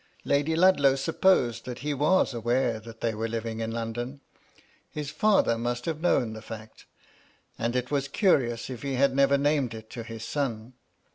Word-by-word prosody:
Lady 145 +3 +1
Ludlow 160 -6 +5
sup 135 +4 -4
posed 125 - +3
that 125 -1 -5
he 150 - 0
was 150 +2 +2
aware 120 0 0
that 115 0 -12
they 115 -1 0
were 110 +2 -2
living 115 0 -4
in 115 0 -2
London. 115 +4 -4 0.7
His 150 -1 -5
father 205 - +3
must 120 +1 -2
have 160 -1 -3
known 120 -10 +2
the 110 - -8
fact, 110 -1 -10 0.7
and 115 +2 -1
it 125 +1 -1
was 140 -1 0
curious 135 - +1
if 125 - -7
he 140 -2 -2
had 135 +1 +2
never 140 0 +4
named 140 -4 +1
it 110 0 -11
to 120 - -6
his 115 0 -7
son. 120 -4 -3
125 Hz, 185 wpm, -27 LUFS, 115-140 Hz, 0.7 s, Ludlow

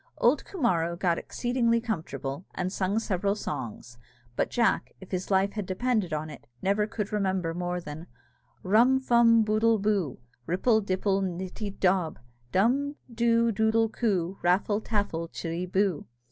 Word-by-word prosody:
Old 255 +5 +3
Coomara 170 - 0
got 175 -2 +1
exceedingly 240 -2 0
comfortable, 160 - -4
and 185 0 -2
sung 195 +2 0
several 200 -2 0
songs; 120 - -6 0.4
but - - 0
Jack, 235 -2 +1
if 190 - -13
his 185 -1 -3
life 195 0 +3
had 210 -4 -4
depended 215 -1 0
on 155 0 -2
it, 155 - -11
never 200 +5 +1
could 210 -2 -4
remember 190 -5 0
more 175 +1 -2
than 160 0 -8 0.6
"_Rum 235 +7 +5
fum 235 -3 +5
boodle 220 +1 +3
boo, 200 -9 0 0.3
Ripple 220 +6 +2
dipple 195 0 0
nitty 190 +2 -4
dob; 180 -4 +2 0.3
Dumdoo 235 - +1
doodle 220 +1 +2
coo, 195 -5 -1
Raffle 195 +4 +2
taffle 200 -7 -2
chittiboo! 180 +1 -1
200 Hz, 135 wpm, -28 LUFS, 180-225 Hz, 0.6 s, Rum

